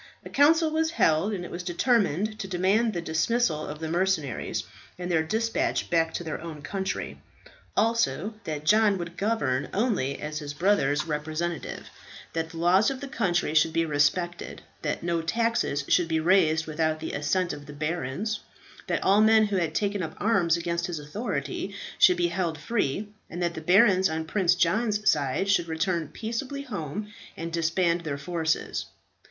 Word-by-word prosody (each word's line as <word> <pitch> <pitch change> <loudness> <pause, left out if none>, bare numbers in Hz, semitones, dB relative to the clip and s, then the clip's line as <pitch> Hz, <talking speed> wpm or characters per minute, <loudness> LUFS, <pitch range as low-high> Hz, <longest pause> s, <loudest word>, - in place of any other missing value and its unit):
A - - -9
council 315 +3 +4
was 320 +1 +1
held, 190 - +2
and 185 -4 -4
it - - -9
was 175 - -4
determined 210 - +1
to 195 - -4
demand 195 +5 +2
the 175 -2 -3
dismissal 160 0 0
of 150 - -6
the 160 +1 -5
mercenaries 170 -5 -1 0.3
and 180 0 -4
their 160 -2 +3
despatch 225 - -1
back 165 -1 +2
to - - -3
their 155 -2 -5
own 155 -3 -8
country; 190 +2 -4 0.6
also 225 0 +1
that 155 -2 -4
John 210 +1 +4
would 170 -1 -6
govern 145 - 0
only 195 - 0
as 150 0 -4
his 145 -2 -6
brother's 150 -5 +2
representative; 160 +2 -3 0.5
that 165 0 -2
the 165 - -10
laws 180 +5 +4
of 270 -1 -4
the 280 - -6
country 175 - 0
should 160 +1 +3
be 165 - +2
respected; 160 +4 0 0.2
that - - -2
no 170 -1 0
taxes 225 -6 0
should 175 -2 +3
be 160 -1 +1
raised 160 -2 +3
without 155 0 -1
the 160 - -5
assent 170 +5 0
of 145 0 -9
the - - -8
barons; 160 +7 -3 0.5
that - - -1
all 200 +2 +5
men 220 0 +6
who 205 -2 -1
had 165 -3 -1
taken 205 -1 0
up 160 -2 -5
arms 185 -7 +2
against 170 0 -2
his 175 -2 -4
authority 150 - -4 0.2
should 180 -1 +6
be 175 -1 +2
held 170 -3 -2
free; 205 - -1 0.2
and 175 - -6
that 170 0 0
the 160 - -6
barons 190 +2 +5
on 160 0 -3
Prince 180 0 +2
John's 210 +4 +1
side 145 +5 +2
should 185 -4 +2
return 165 0 -1
peaceably 255 - -4
home 205 - -5 0.2
and 165 0 -5
disband 170 +1 +1
their 150 -4 -4
forces. 160 +2 -2
175 Hz, 175 wpm, -27 LUFS, 160-205 Hz, 0.6 s, men